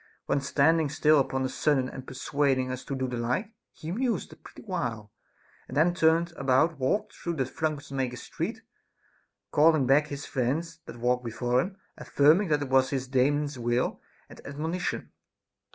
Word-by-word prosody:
When 140 - +1
standing 150 +3 +2
still 150 +1 +4
upon 130 -1 0
a - - +1
sudden 130 0 +1
and 130 0 -9
persuading 130 -1 0
us 130 0 -5
to 140 - -3
do 130 0 -2
the 125 -1 -4
like, 130 - -2 0.2
he 155 - -7
mused 240 +5 -1
a - - -14
pretty - - -14
while, 120 - -4 0.6
and - - -6
then 170 +3 +4
turning 165 0 +3
about 140 +4 +2
walked 135 +11 0
through 170 -2 -4
Trunk 150 +1 -3
makers' 130 -3 -3
Street, - - -4 0.9
calling 155 -2 +4
back 145 +4 +4
his 145 -1 -6
friends 150 +6 -2
that - - -9
walked 125 +1 +1
before 120 +2 0
him, 190 +4 -6 0.2
affirming 155 +8 +4
that 150 -2 +1
it 135 - -6
was 130 0 +4
his 135 -2 -2
Daemon's 140 +2 +1
will 120 +1 0 0.3
and - - -13
admonition. 160 +6 -3
140 Hz, 170 wpm, -28 LUFS, 130-160 Hz, 0.9 s, still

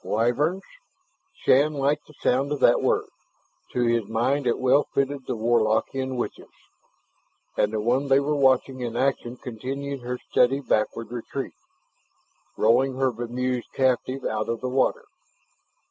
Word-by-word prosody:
Wyverns. 145 - 0 0.8
Shann 145 +4 +4
liked 145 +2 0
the 150 - -17
sound 135 +3 +2
of 150 - -1
that - - +5
word; - - +1 0.7
to 125 - 0
his 115 -3 +1
mind 125 +5 0
it 120 - +2
well 130 +3 +3
fitted 140 -1 -1
the - - -1
Warlockian 120 +3 +1
witches. 120 - -5 1.1
And 105 - +1
the 110 - -1
one 125 +6 +1
they 135 0 +5
were 145 +2 0
watching 130 -1 +2
in 120 -1 -4
action 125 -2 -1
continued 135 +4 -5
her 125 +1 -4
steady 130 +3 +3
backward 115 -3 -1
retreat, 125 +3 -5 1.0
rolling 130 +4 +3
her 130 0 +1
bemused 120 +1 -3
captive 130 0 0
out 110 0 -2
of 115 -1 -2
the 130 - -2
water. 135 - +1
130 Hz, 145 wpm, -25 LUFS, 120-135 Hz, 1.1 s, that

